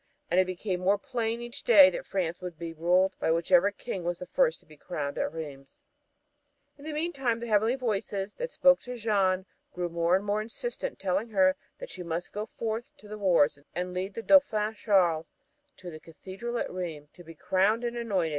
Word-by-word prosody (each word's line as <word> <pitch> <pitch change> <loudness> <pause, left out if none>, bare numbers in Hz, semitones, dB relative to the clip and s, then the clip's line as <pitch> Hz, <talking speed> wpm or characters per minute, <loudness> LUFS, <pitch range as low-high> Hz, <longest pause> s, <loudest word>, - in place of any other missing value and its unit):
And 180 - +4
it 185 - +3
became 185 0 -3
more 195 +3 +3
plain 230 +2 -3
each 240 0 -7
day 195 -5 +8
that - - -6
France 175 -2 -2
would 180 -3 -6
be 165 0 -6
ruled 180 +4 +2
by - - 0
whichever 175 +3 +4
king 200 -2 -6
was 175 0 -2
the 180 - -7
first 160 -2 +1
to - - -27
be 155 - -16
crowned 145 -2 -4
at - - -1
Rheims. 145 -4 -9 1.0
In 285 - -14
the 315 - -4
meantime 280 -7 -1
the 235 - -5
heavenly 220 +2 +2
voices 205 -5 -2
that - - -4
spoke 270 - +4
to 250 0 -7
Jeanne 195 -4 +1 0.3
grew 175 -1 -2
more 170 +1 +2
and 195 +2 -1
more 205 +1 0
insistent, 485 - -5
telling 195 +4 -1
her 280 +5 +4 0.2
that - - -9
she - - -8
must 170 0 -4
go 210 +1 -4
forth 225 +1 -3
to 215 - -15
the 210 0 -7
wars 170 -7 +3 0.2
and 180 +1 -3
lead 185 +2 -3
the 230 - -5
Dauphin 225 -7 +4
Charles 180 -7 +2 0.5
to 180 -1 -9
the 155 - -9
Cathedral 190 +9 -7
at - - -2
Rheims 160 -5 -6
to 175 - -14
be 165 0 -12
crowned 200 +8 +1
and 240 0 -2
anointed. 200 -8 0
195 Hz, 205 wpm, -28 LUFS, 175-230 Hz, 1.0 s, day